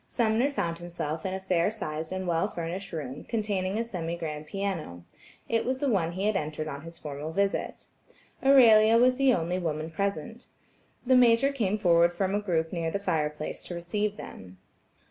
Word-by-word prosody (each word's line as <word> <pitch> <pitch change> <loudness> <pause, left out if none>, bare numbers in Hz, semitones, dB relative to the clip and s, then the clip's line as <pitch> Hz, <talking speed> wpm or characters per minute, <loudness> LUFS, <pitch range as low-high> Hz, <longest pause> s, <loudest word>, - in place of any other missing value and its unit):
Sumner 235 +3 +1
found 170 -12 -2
himself 170 -1 -4
in 190 - -3
a - - -4
fair 180 -1 +1
sized 160 -7 -5
and 185 0 -3
well 170 +3 +1
furnished 185 +1 -5
room, 145 -4 -5
containing 205 -3 -2
a 230 - 0
semi 170 -7 -4
grand 155 -2 -5
piano; 165 - -4 0.4
it 230 0 +1
was 260 +1 -1
the 280 - -1
one 175 -9 +1
he 190 +3 -2
had 215 -1 +1
entered 155 -2 -3
on 140 -2 -6
his 165 +2 -10
formal 150 +1 -6
visit. 200 +3 -1 0.6
Aurelia 230 -5 +7
was 250 +1 +4
the 275 -1 +4
only 175 -3 0
woman 160 -2 -3
present. 200 +5 -3 0.6
The 260 +1 +4
Major 245 +2 +5
came 215 -7 0
forward 170 -3 +4
from 190 +2 -1
a 205 - +1
group 165 -5 -1
near 165 -2 -1
the 180 - -1
fire 160 -6 0
place 150 0 -6
to 175 - -6
receive 205 +5 -2
them. 95 0 -10
185 Hz, 185 wpm, -28 LUFS, 160-215 Hz, 0.6 s, Aurelia